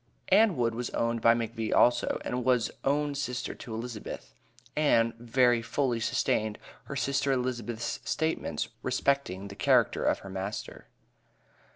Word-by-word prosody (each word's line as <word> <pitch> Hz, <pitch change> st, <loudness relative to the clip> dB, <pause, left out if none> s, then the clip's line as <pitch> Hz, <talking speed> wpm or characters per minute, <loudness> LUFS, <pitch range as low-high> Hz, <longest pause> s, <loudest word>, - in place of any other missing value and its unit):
Ann 210 Hz, 0 st, +5 dB
Wood 120 Hz, -3 st, +1 dB
was 120 Hz, +1 st, -3 dB
owned 115 Hz, 0 st, 0 dB
by 115 Hz, +1 st, +6 dB
McVee 115 Hz, -1 st, -2 dB
also, 120 Hz, 0 st, +3 dB
and 125 Hz, 0 st, -2 dB
was 125 Hz, -2 st, +2 dB
own 145 Hz, +1 st, +1 dB
sister 130 Hz, -3 st, -3 dB
to 120 Hz, -, -10 dB
Elizabeth. 110 Hz, -, -7 dB, 0.4 s
Ann 115 Hz, -7 st, +3 dB
very 120 Hz, 0 st, +3 dB
fully 120 Hz, 0 st, 0 dB
sustained 110 Hz, -1 st, 0 dB, 0.3 s
her 140 Hz, -, -6 dB
sister 140 Hz, 0 st, 0 dB
Elizabeth's 120 Hz, -3 st, -2 dB
statement 160 Hz, -, -1 dB
respecting 120 Hz, -9 st, 0 dB
the 100 Hz, -, -9 dB
character -, -, +3 dB
of -, -, +2 dB
her -, -, -7 dB
master. 95 Hz, +2 st, -5 dB
120 Hz, 140 wpm, -29 LUFS, 115-135 Hz, 0.4 s, by